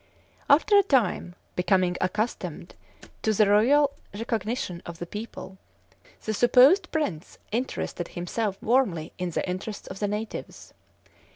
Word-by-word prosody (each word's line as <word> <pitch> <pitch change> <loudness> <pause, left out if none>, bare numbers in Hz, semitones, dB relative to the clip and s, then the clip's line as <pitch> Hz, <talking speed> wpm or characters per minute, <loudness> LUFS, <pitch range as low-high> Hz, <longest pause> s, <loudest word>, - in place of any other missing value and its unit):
After 320 +9 +5
a - - +7
time, 240 - +1 0.2
becoming 180 -1 +2
accustomed 210 +5 -3 0.5
to 220 - +1
the 215 +1 +4
loyal 260 +8 +4 0.2
recognition 220 -4 -3
of 170 -1 -8
the 175 - -5
people, 195 -1 -8 0.7
the 220 - -1
supposed 265 - +5
prince 200 - -3
interested 225 -7 -3
himself 195 +3 -3
warmly 215 -10 +1
in 180 -1 -1
the 170 - -2
interests 190 +3 -5
of 190 - -7
the 205 - 0
natives. 210 +2 -6
210 Hz, 125 wpm, -26 LUFS, 180-245 Hz, 0.7 s, a